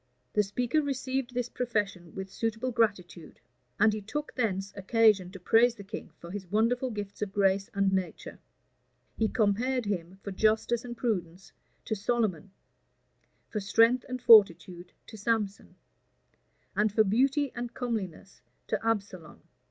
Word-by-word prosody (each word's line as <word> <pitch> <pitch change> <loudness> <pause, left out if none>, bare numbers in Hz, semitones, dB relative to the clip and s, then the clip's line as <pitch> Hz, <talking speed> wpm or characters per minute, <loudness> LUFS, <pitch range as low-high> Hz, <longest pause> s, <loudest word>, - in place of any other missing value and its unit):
The 210 - +4
speaker 245 +9 0
received 265 -3 -3
this 245 -1 -1
profession 205 -9 -3
with 190 0 -6
suitable 225 +4 -2
gratitude; 185 -8 -1 0.4
and 210 +1 +5
he 215 - -4
took 295 +9 -5
thence 195 -5 -2
occasion 205 -1 +3
to 195 +1 -10
praise 230 +6 +4
the 200 - -10
king 195 - -8
for 170 - -10
his 195 -1 -6
wonderful 235 +5 +1
gifts 205 -3 -7
of 205 -2 -2
grace 195 0 +1
and 195 -1 +2
nature: 190 -2 -3 0.8
he 220 - +1
compared 235 +3 +1
him, 190 -2 -4
for 200 - -5
justice 220 +4 +1
and 240 -1 -7
prudence, 185 -6 -3 0.3
to - - -2
Solomon; 205 -4 -1 1.0
for 215 - -3
strength 230 +5 +3
and 255 0 -3
fortitude, 185 -6 +5
to 220 - -11
Samson; 210 -2 -2 1.0
and 210 0 +2
for 220 +2 +4
beauty 265 +7 +2
and 240 0 -5
comeliness, 205 -7 -5 0.3
to - - -1
Absalom. 200 -7 -3
210 Hz, 145 wpm, -29 LUFS, 195-240 Hz, 1.0 s, and